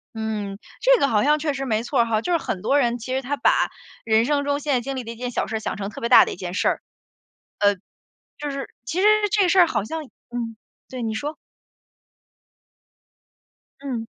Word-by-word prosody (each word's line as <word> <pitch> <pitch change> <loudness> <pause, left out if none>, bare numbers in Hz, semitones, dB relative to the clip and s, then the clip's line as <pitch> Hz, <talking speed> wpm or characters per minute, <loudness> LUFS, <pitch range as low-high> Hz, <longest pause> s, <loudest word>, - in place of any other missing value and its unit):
嗯， 215 -3 -3 0.2
这 - - +5
个 - - +3
好 210 -5 +2
像 300 +1 +4
确 300 -1 -1
实 270 0 -3
没 220 -3 0
错 255 +2 -1
儿 235 - +5
哈， 220 -2 0
就 355 - -3
是 345 - +4
很 195 - -4
多 285 +8 +3
人 240 -3 +1
其 245 +2 -5
实 265 - 0
他 280 +3 -3
把 - - +3 0.3
人 225 0 +3
生 285 +1 +1
中 285 0 0
现 290 -1 -1
在 250 - +2
经 270 +3 -4
历 255 - -4
的 230 - -7
一 - - -8
件 245 +2 -4
小 - - -1
事 220 - -2
儿 - - -4
想 - - -4
成 200 0 -4
特 215 - -9
别 235 - -1
大 - - +9
的 - - -4
一 - - -7
件 175 -1 -6
事 - - +1
儿。 - - -2 0.8
呃 205 -1 +4 0.6
就 295 -1 -4
是 275 0 -5 0.2
其 320 +9 -2
实 420 - +6 0.2
这 400 -4 +4
事 375 - +3
儿 350 - +7
好 320 - -1
像 320 +8 -4 0.3
嗯， 235 -2 -4 0.3
对， 255 -2 -6
你 220 -1 -2
说。 295 +7 -3 2.5
嗯。 245 -5 -3
250 Hz, 245 characters per minute, -23 LUFS, 220-290 Hz, 2.5 s, 大